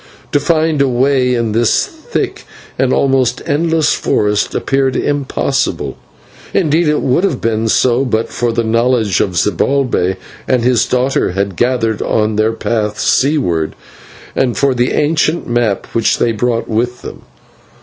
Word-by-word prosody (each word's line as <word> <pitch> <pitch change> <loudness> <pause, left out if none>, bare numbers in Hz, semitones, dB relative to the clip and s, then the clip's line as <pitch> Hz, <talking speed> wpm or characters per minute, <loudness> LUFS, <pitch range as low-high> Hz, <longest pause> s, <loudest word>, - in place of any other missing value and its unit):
To 145 - +2
find 155 0 +1
a 140 - +3
way 130 0 +2
in 115 -2 -1
this 115 +1 +2
thick - - -5 0.3
and 130 -1 +2
almost 130 -3 +1
endless 160 +1 +1
forest 105 0 0
appeared 135 -1 0
impossible; 140 -1 -1 0.6
indeed, 165 -1 +2
it 150 0 +1
would 130 +7 +1
have 160 -10 0
been 115 0 -1
so 125 +3 +2
but 115 -3 -1
for 120 -1 -1
the 115 0 0
knowledge 115 -3 +1
that 95 - -1
Zibalbay 105 +1 +1 0.3
and 125 -2 +1
his 125 -2 +2
daughter 125 -6 0
had 100 0 -2
gathered 115 -1 0
on 110 0 0
their 110 +1 +1
path 105 -2 -2
seaward, 110 - +1 0.6
and 125 -3 0
for 140 -1 +2
an 125 -2 -1
ancient 155 +2 0
map 120 -4 0
which 115 -2 +1
they 120 - +1
brought 115 +1 -1
with 120 +2 -2
them. - - -8
125 Hz, 150 wpm, -15 LUFS, 110-140 Hz, 0.6 s, a